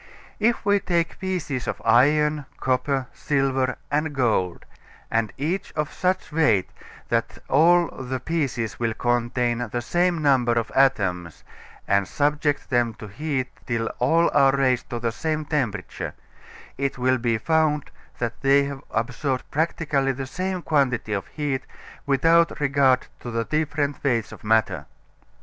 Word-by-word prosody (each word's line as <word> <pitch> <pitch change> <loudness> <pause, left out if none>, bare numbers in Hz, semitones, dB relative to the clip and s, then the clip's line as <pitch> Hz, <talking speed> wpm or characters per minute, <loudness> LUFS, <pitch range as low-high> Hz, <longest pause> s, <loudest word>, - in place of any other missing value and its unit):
If 230 +1 +1
we 205 0 +4
take 170 -3 -1
pieces 175 - -3
of - - -3
iron, 145 +5 +3
copper, 130 +1 0
silver 135 -3 0
and 150 0 0
gold, 110 -9 0 0.7
each 170 +7 -2
of 150 -1 -2
such 185 -1 -1
weight 115 - +3
as - - -20 0.2
that - - -1
all 170 +5 +5
the 130 0 -5
pieces 135 -6 -2
will 115 -2 -1
contain 120 0 0
the 120 - -1
same 175 +4 +1
number 130 -4 +3
of 115 -1 -1
atoms, 95 - +1 0.4
and 100 -1 +2
subject 145 0 0
them 120 -3 +2
to 105 -1 -10
heat 135 +2 -2 0.2
till 115 -2 -1
all 165 +7 +3
are 135 -1 +5
raised 130 -2 +1
to 120 - -3
the 115 0 -1
same 155 +6 -2
temperature, 145 -8 -3 0.6
it 140 -1 -1
will 130 0 +2
be 115 -1 +1
found 155 +1 +1 0.3
that 120 -1 -3
they 140 +1 +5
have 140 -1 -5
all - - +1
absorbed 125 +3 -3
practically 145 -3 0
the 135 +1 -5
same 185 +6 -3
quantity 130 -8 +1
of 100 -2 -3
heat 145 -4 -2 0.5
without 165 +4 +3
regard 140 -3 +3
to 120 - -7
the 115 -1 -1
different 150 -1 -1
weights 115 -6 0
of - - -12
matter. 105 -8 +1
135 Hz, 145 wpm, -24 LUFS, 120-150 Hz, 0.7 s, all